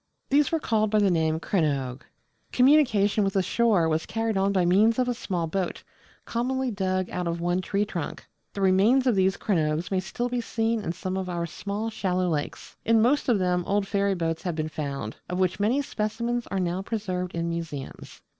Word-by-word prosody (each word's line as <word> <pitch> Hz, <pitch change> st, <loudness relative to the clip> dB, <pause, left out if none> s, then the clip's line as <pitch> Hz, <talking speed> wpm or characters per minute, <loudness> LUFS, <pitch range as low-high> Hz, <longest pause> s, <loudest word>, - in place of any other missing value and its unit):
These 285 Hz, +1 st, +4 dB
were 325 Hz, -, +1 dB
called 215 Hz, -6 st, +1 dB
by 215 Hz, -, +2 dB
the 200 Hz, -2 st, +4 dB
name 160 Hz, -2 st, +1 dB
Crannoge. 140 Hz, -8 st, -1 dB, 0.5 s
Communication 245 Hz, -7 st, +4 dB
with 195 Hz, -1 st, 0 dB
the 195 Hz, -, +2 dB
shore 210 Hz, -6 st, +2 dB
was 160 Hz, 0 st, -1 dB
carried 225 Hz, -1 st, -1 dB
on 195 Hz, +1 st, +2 dB
by 185 Hz, -3 st, +2 dB
means 210 Hz, +6 st, +4 dB
of 255 Hz, -1 st, +1 dB
a 245 Hz, -, +1 dB
small 180 Hz, -7 st, -2 dB
boat, 180 Hz, +2 st, -3 dB, 0.4 s
commonly 255 Hz, +2 st, -1 dB
dug 185 Hz, -2 st, -1 dB
out 180 Hz, -1 st, -2 dB
of 170 Hz, 0 st, -2 dB
one 175 Hz, +2 st, 0 dB
tree 200 Hz, +2 st, 0 dB
trunk. 175 Hz, -6 st, -5 dB, 0.3 s
The 200 Hz, -, -4 dB
remains 200 Hz, +8 st, +4 dB
of 250 Hz, -, +4 dB
these 190 Hz, -1 st, +2 dB
crannoges 165 Hz, -4 st, 0 dB
may 190 Hz, -, +2 dB
still 240 Hz, +6 st, -3 dB
be 245 Hz, 0 st, -2 dB
seen 225 Hz, 0 st, -1 dB
in 165 Hz, -, -2 dB
some 185 Hz, +1 st, -4 dB
of 190 Hz, -1 st, -3 dB
our 170 Hz, -1 st, -2 dB
small 205 Hz, +6 st, -4 dB
shallow 185 Hz, -4 st, 0 dB
lakes. 150 Hz, -3 st, -4 dB
In 225 Hz, 0 st, +4 dB
most 255 Hz, +5 st, +2 dB
of 235 Hz, -, +4 dB
them 180 Hz, -1 st, +1 dB
old 200 Hz, 0 st, +1 dB
ferry 200 Hz, -1 st, +1 dB
boats 165 Hz, -2 st, -2 dB
have 175 Hz, -3 st, -3 dB
been 155 Hz, 0 st, -2 dB
found, 140 Hz, -7 st, -5 dB
of 180 Hz, -, -2 dB
which 185 Hz, 0 st, +1 dB
many 240 Hz, +8 st, +2 dB
specimens 235 Hz, +1 st, -2 dB
are 195 Hz, -, -2 dB
now 180 Hz, +1 st, -1 dB
preserved 185 Hz, -5 st, -3 dB
in 170 Hz, 0 st, -1 dB
museums. 165 Hz, -5 st, -6 dB
195 Hz, 200 wpm, -26 LUFS, 175-225 Hz, 0.5 s, These